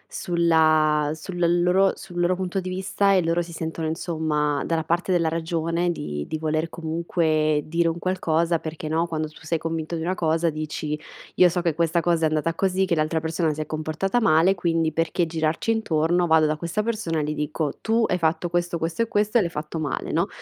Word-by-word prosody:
sulla 155 -3 +3
sulla 175 +2 -2
loro 180 +3 +3
sul 175 -2 -8
loro 175 +1 +2
punto 185 +1 -2
di 185 0 -5
vista 190 +2 +1
e 185 -2 +3
loro 165 +1 +1
si 170 0 -7
sentono 160 0 -4
insomma 155 -3 -1
dalla 165 -1 -1
parte 170 +4 -1
della 170 -2 +2
ragione 165 +1 -1
di 75 - -4
di 155 - -3
voler 155 +1 -1
comunque 160 -2 0
dire 170 +1 +1
un 165 0 -1
qualcosa 170 -2 0
perché, 155 0 -6
no, 165 +2 0
quando 155 -2 -2
tu 155 - -16
sei 160 +1 -1
convinto 165 0 -3
di 160 - -3
una 180 +3 0
cosa 165 -1 +1
dici: 150 0 -4 0.4
"Io 180 - +6
so 175 +1 -1
che 170 -2 +1
questa 170 +2 +1
cosa 165 -1 +2
è - - +5
andata 155 +1 0
così, 190 +2 +1
che 185 - -1
l'altra 160 0 +1
persona 160 0 0
si 155 - -4
è - - -3
comportata 155 +9 -1
male, 165 0 +4
quindi 165 -3 0
perché 165 +2 0
girarci 160 +5 -1
intorno, 175 -5 +1
vado 160 -1 +5
da 155 0 0
questa 170 +6 -2
persona 205 -9 -1
gli 150 +1 -2
dico: 150 0 -3
"Tu 225 +1 +2
hai 180 - 0
fatto 165 +1 0
questo, 175 0 -1
questo 165 +5 -2
e 230 - +1
questo 210 +1 +2
e - - +3
l'hai 175 - -1
fatto 155 0 -5
male," 150 -3 -3
no, - - +1
165 Hz, 210 wpm, -24 LUFS, 155-175 Hz, 0.4 s, Io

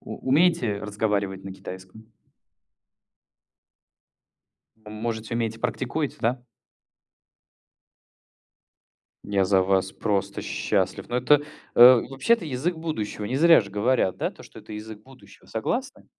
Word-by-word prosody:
У - - -8
умеете 130 - +3
разговаривать 100 -2 -2
на 95 - -6
китайском? 95 +3 -11 2.8
Можете, 110 +1 -5
умеете, 115 -1 -2
практикуете, 140 +3 -2
да? 120 +2 -1 2.8
Я 100 -2 +1
за 95 0 +3
вас 95 0 +1
просто 100 -1 -2
счастлив! - - -1
Ну, 120 - -3
это, 140 +4 +4 0.3
э, - - +5 0.3
вообще, 135 +11 +2
это 230 - -1
язык 150 +5 -2
будущего. 155 -11 -4
Не 125 +6 -2
зря 165 -3 +6
же 100 - -11
говорят, 105 -1 +1
да, - - -2
то - - -15
что - - -13
это - - -11
язык 105 0 -8
будущего. 105 -6 -18
Вы - - -21
согласны? 245 - -3
110 Hz, 120 wpm, -25 LUFS, 100-130 Hz, 2.8 s, зря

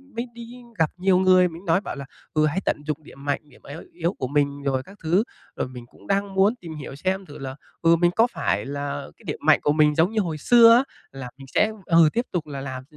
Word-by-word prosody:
mới 235 +2 -3
đi 235 +1 -10 0.2
gặp 160 -2 +2
nhiều 185 0 +3
người, 185 -1 +5
mình 170 +3 -11
nói 170 +2 +2
bảo - - -6
là, 140 -1 -7 0.3
ừ, 155 -1 +3
hãy 155 +5 0
tận - - +1
dụng 155 0 -3
điểm 140 -1 -14
mạnh, 145 -1 0
điểm - - -20
yếu 150 +4 -8
yếu 170 +1 -1
của 130 - -4
mình 140 0 0
rồi 135 -2 0
các 195 +6 -15
thứ. 175 +6 +3 0.3
Rồi - - -2
mình 125 -2 -10
cũng - - -20
đang 200 0 0
muốn 200 +5 +4
tìm 165 -9 -9
hiểu 140 -2 -8
xem 190 +6 -2
thử 145 - -11
là, 135 -1 -6 0.3
ừ, 165 0 +5
mình 175 +1 +3
có 230 +2 +5
phải - - -1
là 140 0 -4
cái - - -21
điểm 150 - -3
mạnh 155 -1 +5
của 145 - +3
mình 150 0 +3
giống 165 +5 +3
như 220 - 0
hồi 165 -5 -3
xưa 230 +7 +7
á, 255 - +3 0.3
là 135 -2 -8
mình 135 -1 -12
sẽ, 215 - +3
ừ, 165 -2 +5
tiếp 235 +2 0
tục 170 -4 -2
là 140 -2 -6
làm 130 -1 -6
160 Hz, 260 wpm, -24 LUFS, 140-190 Hz, 0.3 s, xưa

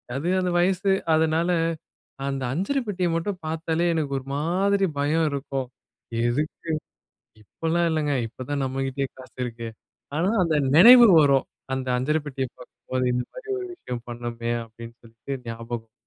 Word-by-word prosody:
அது 150 +6 -2
அந்த 180 -1 0
வயசு 190 +2 +2 0.2
அதனால, 160 +2 +2 0.8
அந்த 135 -1 -2
அஞ்சறப்பெட்டியை 195 - -1
மட்டும் 180 +3 -2
பாத்தாலே 160 +1 -1
எனக்கு 150 -4 -1
ஒரு 130 - -14
மாதிரி 195 +6 +2
பயம் 155 +3 +2
இருக்கும். 135 -2 -3 0.6
எதுக்கு? 150 +6 -2 0.7
இப்பலாம் 165 +8 0
இல்லங்க. 150 -2 0
இப்ப 125 +2 -9
தான் 140 -1 0
நம்மகிட்டயே 135 +1 -2
காசு 130 - -14
இருக்கே. 115 -1 -6 0.5
ஆனா 185 +6 +2
அந்த 160 -2 +1 0.2
நினைவு 240 +6 +10
வரும். 140 -2 +4 0.3
அந்த 130 -1 -4
அஞ்சரபெட்டிய 145 0 -1
பார்க்கும்போது, 130 0 -4
இந்த 125 - 0
மாரி - - -10
ஒரு 370 - -5
விஷயம் 125 - -7
பண்ணமே! 120 0 -4
அப்டினு 115 +1 -11
சொல்ட்டு 115 +4 -7
ஞாபகம். 115 -1 -6
145 Hz, 135 wpm, -25 LUFS, 130-170 Hz, 0.8 s, நினைவு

